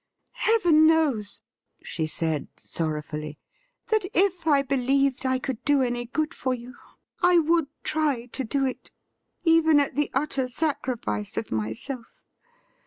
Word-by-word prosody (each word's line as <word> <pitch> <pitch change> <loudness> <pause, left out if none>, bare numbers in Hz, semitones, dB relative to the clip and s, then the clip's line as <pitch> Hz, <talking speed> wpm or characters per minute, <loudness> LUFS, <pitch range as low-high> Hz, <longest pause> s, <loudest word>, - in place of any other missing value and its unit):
' - - -50 0.2
Heaven 345 -9 +5
knows,' 295 -11 +1 0.4
she 160 -2 -3
said 155 -1 0
sorrowfully, 150 -2 -4 0.3
' - - -48
that 435 -2 +2
if 360 -2 +2
I 285 -3 +4
believed 275 0 +1
I 260 0 +2
could 255 -2 -5
do 285 -2 +3
any 240 -1 -2
good 305 +5 -2
for 260 -1 -1
you 245 +1 -10 0.5
I 355 -1 +5
would 330 -1 +3 0.2
try 300 -6 0
to 260 +2 -5
do 270 +4 0
it, 260 - -5 0.5
even 325 -2 +5
at 280 - 0
the 295 0 +1
utter 270 -2 0
sacrifice 245 - -2
of 110 - -3
myself. 110 - -4
270 Hz, 145 wpm, -25 LUFS, 235-315 Hz, 0.5 s, Heaven